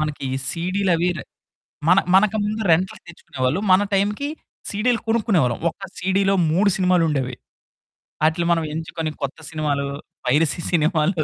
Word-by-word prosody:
మనకి 150 Hz, -3 st, -3 dB, 0.2 s
సీడీ‌లు 185 Hz, +3 st, 0 dB
అవి 175 Hz, +2 st, +1 dB
రె -, -, -7 dB, 0.6 s
మన 180 Hz, +2 st, +6 dB, 0.2 s
మనకు 215 Hz, +2 st, +4 dB
ముందు 215 Hz, +2 st, -2 dB
రెంట్లుకు 180 Hz, +4 st, +1 dB
తెచ్చుకునేవాళ్ళు. 135 Hz, -3 st, -3 dB
మన 185 Hz, -, +6 dB
టైంకి 205 Hz, +8 st, 0 dB, 0.4 s
సీడీ‌లు 225 Hz, +3 st, +1 dB
కొనుక్కునేవాళ్ళం. 195 Hz, -, +2 dB
ఒక్క 165 Hz, -, -15 dB, 0.2 s
సీడీ‌లో 195 Hz, +1 st, +1 dB, 0.2 s
3 195 Hz, +5 st, +3 dB
సినిమాలుండేవి. 165 Hz, -9 st, +1 dB, 0.9 s
ఆటిలిని 160 Hz, +2 st, +1 dB
మనం 165 Hz, -1 st, 0 dB
ఎంచుకొని 160 Hz, 0 st, -4 dB
కొత్త 140 Hz, -, -3 dB
సినిమాలు 150 Hz, -3 st, -1 dB, 0.4 s
పైరసీ 150 Hz, +6 st, +2 dB
సినిమాలు 160 Hz, 0 st, +2 dB
170 Hz, 130 wpm, -22 LUFS, 155-195 Hz, 0.9 s, మన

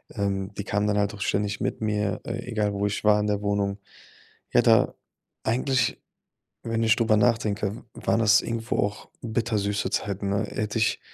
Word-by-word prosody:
Ähm, 100 Hz, -1 st, -2 dB
die 100 Hz, -, -2 dB
kam 100 Hz, 0 st, 0 dB
dann 105 Hz, -, +1 dB
halt 100 Hz, 0 st, +1 dB
auch 100 Hz, -, -11 dB
ständig 100 Hz, 0 st, -1 dB
mit -, -, -1 dB
mir, 105 Hz, -2 st, 0 dB
äh, 115 Hz, 0 st, -3 dB
egal 105 Hz, -3 st, 0 dB
wo 100 Hz, 0 st, -1 dB
ich 100 Hz, -, -3 dB
war 105 Hz, 0 st, +5 dB
in 105 Hz, -, 0 dB
der 105 Hz, -1 st, 0 dB
Wohnung. 100 Hz, -1 st, -1 dB, 0.7 s
Ja -, -, +6 dB
da -, -, +4 dB, 0.5 s
eigentlich, 125 Hz, +1 st, +1 dB, 0.6 s
wenn 115 Hz, 0 st, -1 dB
ich 110 Hz, -1 st, +5 dB
darüber 115 Hz, -2 st, +3 dB
nachdenke, 105 Hz, -2 st, +1 dB
w -, -, -12 dB, 0.3 s
waren -, -, +3 dB
das 110 Hz, -1 st, +5 dB
irgendwo 115 Hz, 0 st, -2 dB
auch 105 Hz, +1 st, -2 dB
bittersüße 110 Hz, -3 st, -1 dB
Zeiten, 100 Hz, -1 st, -2 dB
ne? 100 Hz, 0 st, 0 dB
Hätte 105 Hz, +1 st, -3 dB
ich 110 Hz, -, +1 dB
105 Hz, 185 wpm, -26 LUFS, 100-110 Hz, 0.7 s, Ja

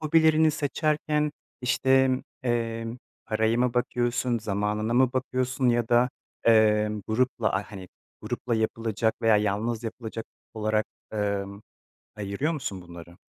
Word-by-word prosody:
hobilerini 160 Hz, 0 st, +4 dB
seçerken, 150 Hz, 0 st, 0 dB, 0.3 s
işte, 130 Hz, +1 st, +3 dB, 0.3 s
emm, 115 Hz, -1 st, -1 dB, 0.3 s
paraya 110 Hz, +1 st, +1 dB
mı 125 Hz, -1 st, +1 dB
bakıyorsun, 120 Hz, -1 st, 0 dB
zamanına 105 Hz, +2 st, -1 dB
mı 130 Hz, 0 st, +4 dB
bakıyorsun 130 Hz, 0 st, 0 dB
ya 120 Hz, -1 st, +2 dB
da, 120 Hz, +1 st, +4 dB, 0.3 s
emm, 105 Hz, -1 st, +4 dB
grupla, 120 Hz, 0 st, +1 dB
aaa, 100 Hz, +2 st, -2 dB
hani, 95 Hz, -2 st, -8 dB, 0.7 s
yapılacak 110 Hz, 0 st, 0 dB
veya 110 Hz, -1 st, +5 dB
yalnız 105 Hz, +3 st, 0 dB
yapılacak 115 Hz, 0 st, -6 dB, 0.3 s
olarak, 110 Hz, 0 st, 0 dB, 0.3 s
ımm, 100 Hz, -1 st, -2 dB, 0.5 s
ayırıyor 105 Hz, +10 st, -1 dB
musun 100 Hz, -, -4 dB
bunları? 85 Hz, 0 st, -12 dB
115 Hz, 115 wpm, -27 LUFS, 105-130 Hz, 0.7 s, veya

